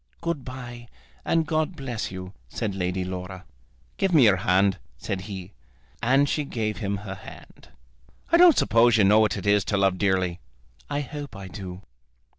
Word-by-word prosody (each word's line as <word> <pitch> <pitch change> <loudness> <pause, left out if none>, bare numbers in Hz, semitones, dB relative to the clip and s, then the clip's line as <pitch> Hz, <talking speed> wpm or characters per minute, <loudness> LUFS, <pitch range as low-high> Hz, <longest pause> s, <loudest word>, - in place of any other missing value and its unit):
"Good 170 -5 -3
bye, 120 -2 -8 0.4
and 165 -1 +1
God 155 +3 -1
bless 120 -6 -4
you," 95 0 -8 0.2
said 105 - -3
Lady 90 0 -2
Laura. 95 0 -6 0.5
"Give 190 -3 +1
me 145 - +7
your 105 -4 +5
hand," 95 +1 +2 0.2
said 95 +9 -4
he. 95 -1 -7 0.5
And 135 +4 +3
she 150 - 0
gave 110 -6 -3
him 100 -2 -2
her 95 - -5
hand. 95 - -13 0.6
"I 335 - +6
don't 345 -2 +7
suppose 115 +1 +4
you 105 - +5
know 105 +3 +6
what 105 -4 +2
it - - -6
is 100 -1 +4
to 105 - 0
love 95 -2 +2
dearly." 95 -3 +1 0.5
"I 145 0 -1
hope 145 -2 -7
I 95 -1 -8
do." 95 0 -8
105 Hz, 175 wpm, -25 LUFS, 95-135 Hz, 0.6 s, me